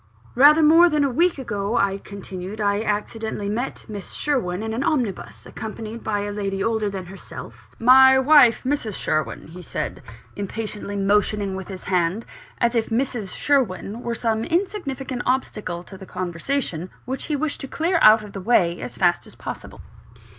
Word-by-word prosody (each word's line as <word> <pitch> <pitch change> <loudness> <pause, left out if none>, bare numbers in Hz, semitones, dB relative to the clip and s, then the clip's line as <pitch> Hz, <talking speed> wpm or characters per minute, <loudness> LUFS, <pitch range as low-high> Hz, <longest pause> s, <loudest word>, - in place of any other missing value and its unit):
"Rather 295 +5 +7
more 330 +3 +7
than 300 -2 +2
a 275 - +1
week 340 +6 +2
ago," 215 -3 -2
I 195 0 +1
continued, 195 0 -8
"I 205 0 +1
accidentally 210 -1 -3
met 240 +5 -3
Miss 205 -4 -7
Sherwin 215 -10 -1
in 220 0 -3
an 245 +4 -1
omnibus, 245 - -2
accompanied 220 +1 -7
by 205 -2 -1
a 205 0 -3
lady 195 -1 -2
older 220 -2 0
than 190 -2 -6
herself 190 +2 -11
" - - -30 0.2
"My 265 0 +8
wife; 265 -4 +6
Mrs. 255 -7 -1
Sherwin," 155 0 -2
he 180 +3 -10
said, - - -4 0.3
impatiently 205 0 -5
motioning 200 0 +1
with 190 -1 -6
his 190 -2 -8
hand, 180 +3 0 0.3
as 235 0 +2
if 230 -2 0
"Mrs. 230 -3 -1
Sherwin" 235 -5 0
were 235 -1 -3
some 225 -1 0
insignificant 280 - -2
obstacle 210 -9 -1
to 190 +1 -12
the 190 - -10
conversation, 180 - -3 0.2
which 260 +1 -4
he 300 - -1
wished 295 +1 -2
to 275 - -5
clear 335 +5 0
out 215 0 +7
of 210 - -11
the 195 - -6
way 180 -5 +2
as 120 -1 -6
fast - - +2
as - - -14
possible. - - -8
220 Hz, 175 wpm, -23 LUFS, 195-265 Hz, 0.3 s, My